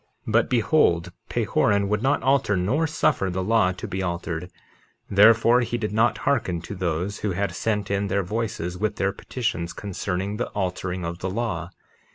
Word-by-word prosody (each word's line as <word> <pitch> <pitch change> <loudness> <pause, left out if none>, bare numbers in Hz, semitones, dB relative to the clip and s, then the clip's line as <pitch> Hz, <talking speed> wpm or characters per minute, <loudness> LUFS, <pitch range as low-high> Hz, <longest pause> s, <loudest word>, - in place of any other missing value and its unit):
51:3 - - -4
But 115 +1 +3
behold, 105 - +2 0.2
Pahoran 100 -1 +1
would 105 +1 0
not 135 +3 +1
alter 135 -7 +2
nor 130 - +1
suffer 95 -10 +1
the 95 +1 -2
law 105 -2 +3
to 90 - -7
be 95 - -3
altered; 85 -1 -3 0.6
therefore, 115 +4 +6
he 120 0 -1
did 105 -3 -3
not 110 +3 +2
hearken 110 -11 +1
to - - -6
those 90 +1 -2
who 105 -3 -1
had 100 0 -1
sent 105 0 -1
in 100 0 0
their 100 0 0
voices 90 -3 -3
with 110 +1 0
their 100 - 0
petitions 95 -6 -3
concerning 100 +1 -3
the 120 - -2
altering 90 -2 -2
of 85 +1 -5
the 95 - -3
law. 105 -4 -2
100 Hz, 180 wpm, -24 LUFS, 90-115 Hz, 0.6 s, therefore